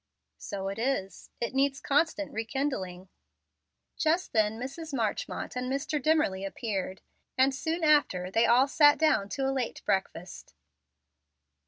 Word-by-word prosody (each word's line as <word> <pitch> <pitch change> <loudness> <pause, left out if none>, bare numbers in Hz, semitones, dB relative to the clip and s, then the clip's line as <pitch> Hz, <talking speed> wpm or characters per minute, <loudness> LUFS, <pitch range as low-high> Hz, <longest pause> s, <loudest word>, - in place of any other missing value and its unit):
"So 195 -1 -5
it 200 - -5
is; 230 -6 -2
it 235 0 -3
needs 275 +1 +1
constant 300 +1 0
rekindling." 220 -6 -3 0.9
Just 330 +4 0
then 215 0 +2
Mrs. 275 +4 -6
Marchmont 220 -1 -3
and 250 +1 -3
Mr. 285 +2 -2
Dimmerly 310 -11 +1
appeared, 195 -2 -4 0.4
and 265 +1 +4
soon 320 +5 -3
after 285 - +3
they 225 +3 +3
all 250 +3 +5
sat 290 +1 +5
down 300 -11 +2
to 270 +3 -2
a 270 - 0
late 255 -3 -3
breakfast. 185 -2 -3
260 Hz, 135 wpm, -29 LUFS, 200-290 Hz, 0.9 s, all